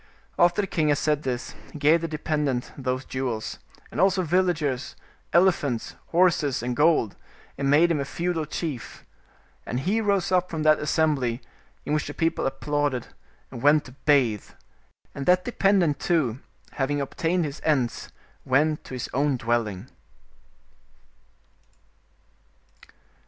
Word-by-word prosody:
After 175 +3 +4
the 195 - -3
king 160 -4 0
had 145 - +3
said 150 0 +1
this, 125 -3 -4 0.2
he - - -9
gave 155 +3 +4
the 165 - -2
dependent 150 -5 -2
those 130 -1 -3
jewels, 125 -4 -4 0.3
and - - -1
also 190 0 +3
villages, 160 -6 0 0.4
elephants, 165 -9 +2
horses 170 -8 +2
and 125 0 -2
gold, 150 -9 +3 0.4
and 135 0 -1
made 160 +4 +5
him 155 - +1
a - - 0
feudal 170 +1 -2
chief. 150 -4 -5 0.6
And 125 +2 -3
he 205 +9 +1
rose 200 -4 +1
up 180 -1 +2
from 160 -2 -3
that 155 0 +5
as 150 - -3
sembly, 135 -7 +1 0.5
in 150 - -1
which 150 - 0
the 145 - -7
people 165 -4 0
applauded, 145 -1 -2 0.4
and 120 -3 -8
went 145 +2 +4
to 130 - -11
bathe; 130 -6 +1 0.6
and 140 - -6
that 180 0 +4
dependent 195 - +2
too, 135 -9 0 0.3
having 145 +1 -1
obtained 165 +5 -1
his 145 0 -6
ends, 130 -6 0 0.3
went 150 +4 +1
to 130 - -7
his 125 - -4
own 140 +1 +1
dwelling. 115 -3 -1
150 Hz, 140 wpm, -25 LUFS, 130-170 Hz, 0.6 s, made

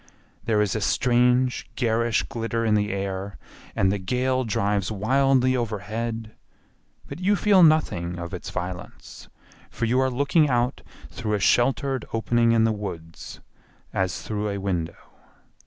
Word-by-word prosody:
There 110 -2 +2
is 100 -1 -2
a 110 - -2
strange 125 +3 +2
garish 115 -1 +1
glitter 115 0 -3
in 110 - +2
the 105 0 +1
air 95 0 -4 0.4
and 95 0 +2
the 100 - -1
gale 130 +6 0
drives 100 -3 -1
wildly 130 +4 +2
overhead, 115 0 -4 0.7
but 140 - -8
you 195 +3 +2
feel 200 -1 +4
nothing 120 - +3
of 85 +2 -7
its 90 - -6
violence, 90 0 -7 0.4
for - - -3
you 125 +3 +2
are 130 0 +2
looking 140 +4 +2
out 125 +1 0 0.3
through 105 -3 -2
a - - -1
sheltered 135 +5 +2
opening 115 +1 +2
in 115 -1 +4
the 115 - +3
woods, 90 -6 -7 0.5
as 95 -2 -2
through 105 -1 -3
a 100 - -3
window. 90 -4 -3
115 Hz, 145 wpm, -24 LUFS, 100-125 Hz, 0.7 s, feel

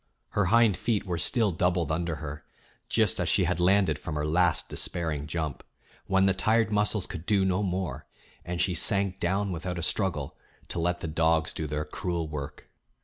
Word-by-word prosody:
Her 105 - +1
hind 110 0 +4
feet 110 0 0
were 90 -3 -2
still 115 -1 +2
doubled 85 -1 0
under 85 +1 -1
her, 75 -1 -7 0.5
just - - +2
as - - +1
she - - +4
had - - 0
landed 95 +2 +3
from 80 -4 -5
her 75 0 -1
last 90 +3 +2
despairing 80 -4 -2
jump, 80 -2 -3 0.4
when 95 0 +3
the 95 - +4
tired 110 +3 +2
muscles 105 -1 +1
could 85 -1 -8
do 100 -3 +3
no 95 +1 +1
more, 90 -8 -3 0.4
and 85 0 -4
she 90 +3 +2
sank 100 +2 +1
down 95 +3 0
without 90 +1 -4
a 85 - -3
struggle 85 -7 -1 0.3
to - - -3
let 85 +1 0
the - - -3
dogs 80 0 +1
do 80 - -3
their 75 +1 -2
cruel 85 +1 -3
work. 75 -1 -7
90 Hz, 190 wpm, -28 LUFS, 80-95 Hz, 0.5 s, hind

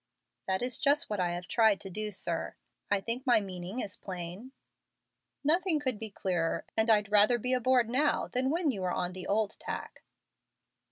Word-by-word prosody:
"That 190 +3 0
is 250 -1 -2
just 290 -4 +2
what 210 - -1
I 180 -1 +1
have 175 0 -5
tried 220 -4 +4
to 195 - -8
do, 215 +3 -3
sir. 195 - -3 0.3
I 205 -1 +2
think 235 +5 -2
my 240 -3 +6
meaning 190 +3 -5
is 200 - -5
plain?" 185 +6 -7 0.9
"Nothing 335 +2 +3
could 260 -7 -1
be 220 - -3
clearer, 180 -4 -1
and 220 +1 +2
I'd 210 -2 +3
rather 210 +3 +6
be 250 +2 -1
aboard 250 -1 +3
now 270 +6 +1
than 255 +1 0
when 325 -1 +1
you 200 - -5
were 185 - 0
on 180 0 -2
the 185 0 -7
old 210 0 0
tack." - - -6
215 Hz, 185 wpm, -30 LUFS, 190-255 Hz, 0.9 s, my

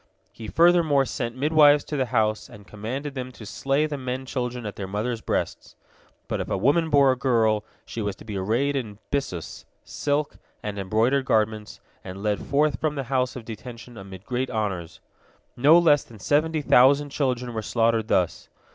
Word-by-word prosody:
He 110 - -9
furthermore 165 -4 +4
sent 120 -2 -4
midwives 150 0 +5
to 150 - -5
the 130 -3 0
house, 110 -3 0
and 105 -1 -14
commanded 125 +8 -5
them 130 -1 -5
to 110 - -11
slay 135 +7 0
the 150 -2 -4
men 130 0 -4
children 125 -2 -4
at 105 - -5
their 95 - -5
mothers' 110 +4 -3
breasts. - - -3 0.5
But - - -2
if - - -5
a - - 0
woman 145 - +2
bore 140 -3 +5
a - - 0
girl, 115 -5 +2 0.2
she 115 - -6
was 100 -2 -2
to - - -15
be 105 -2 -6
arrayed 115 +9 0
in 110 -7 -4
byssus, 135 - -3 0.2
silk, 145 0 -2 0.3
and 105 -1 -4
embroidered 115 +8 +1
garments, 110 -2 0 0.2
and 95 +1 -8
led 105 -1 0
forth 150 +1 +1
from 155 -1 0
the 140 - -2
house 130 -1 +1
of 120 -3 -8
detention 120 +2 -9
amid 95 -1 -10
great 125 +1 -2
honors. 100 -7 -3 0.5
No 145 +7 +6
less 155 -5 +4
than 115 - -15
seventy 155 +7 +1
thousand 140 +3 +5
children 125 -4 -1
were 110 - -3
slaughtered 115 0 +1
thus. 90 -6 0
125 Hz, 180 wpm, -25 LUFS, 110-140 Hz, 0.5 s, No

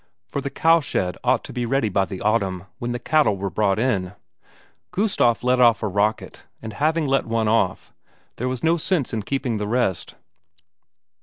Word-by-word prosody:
For 140 - -4
the 140 - -3
cowshed 145 - +1
ought 125 -1 +2
to - - -9
be 125 - -2
ready 120 0 +1
by 95 -1 +1
the 95 -1 -7
autumn, 100 -4 0
when 120 0 -3
the 120 - -2
cattle 125 -4 +2
were 95 0 -3
brought 100 +1 +1
in. 100 -6 0 0.8
Gustaf 185 - +1
let 125 0 +2
off 115 -2 +4
a - - +1
rocket, 100 +2 -2
and 110 -1 -8
having 155 +5 +1
let 135 0 +1
off 115 -1 0
one, - - -41 0.4
there 125 +2 -2
was 130 -1 -4
no 165 +1 +3
sense 160 -6 -1
in 110 - -1
keeping 125 0 -2
the 105 - -3
rest. 115 -5 -1
120 Hz, 180 wpm, -22 LUFS, 105-135 Hz, 0.8 s, off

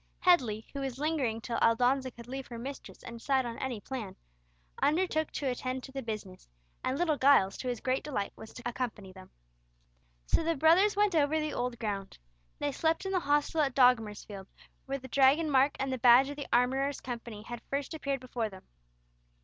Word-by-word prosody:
Headley, 240 -12 +3
who 280 - -4
was 265 -2 -4
lingering 275 -7 -1
till 235 +1 -3
Aldonza 250 +3 +3
could 235 -1 -12
leave 265 +1 -6
her 235 - -8
mistress 270 +4 -8
and 235 -1 -8
decide 265 +1 +1
on 235 -1 -5
any 255 -4 -3
plan, 220 -4 -6 0.7
undertook 315 -1 +1
to 285 - -3
attend 255 0 -2
to 270 - -9
the 270 0 -4
business, 215 -5 -7 0.4
and 260 - -1
little 320 -3 +1
Giles, 260 -9 +5
to 255 - -4
his 245 -2 -2
great 260 0 0
delight, 260 -9 -3
was 220 - -11
to 250 - -10
accompany 240 -5 -4
them. 185 0 -13 1.0
So - - +2
the 330 0 0
brothers 340 +8 +4
went 410 -1 +3
over 310 0 +2
the 305 0 -2
old 245 -1 -2
ground. 200 -4 -4 0.4
They 290 - -1
slept 320 +5 0
in 385 - -2
the 375 - +2
hostel 295 +1 +1
at 270 -4 0
Dogmersfield 215 -6 +2 0.4
where 275 0 -2
the 260 -1 -10
Dragon 280 +5 +4
mark 275 +1 +4
and 270 0 -1
the 260 - -3
badge 250 +3 +7
of - - -6
the 285 -1 -6
Armourers' 265 +3 +2
Company 230 -4 -7
had 240 0 -7
first 280 +2 -2
appeared 280 -4 -3
before 245 -3 -3
them. 190 -2 -13
260 Hz, 195 wpm, -30 LUFS, 235-285 Hz, 1.0 s, badge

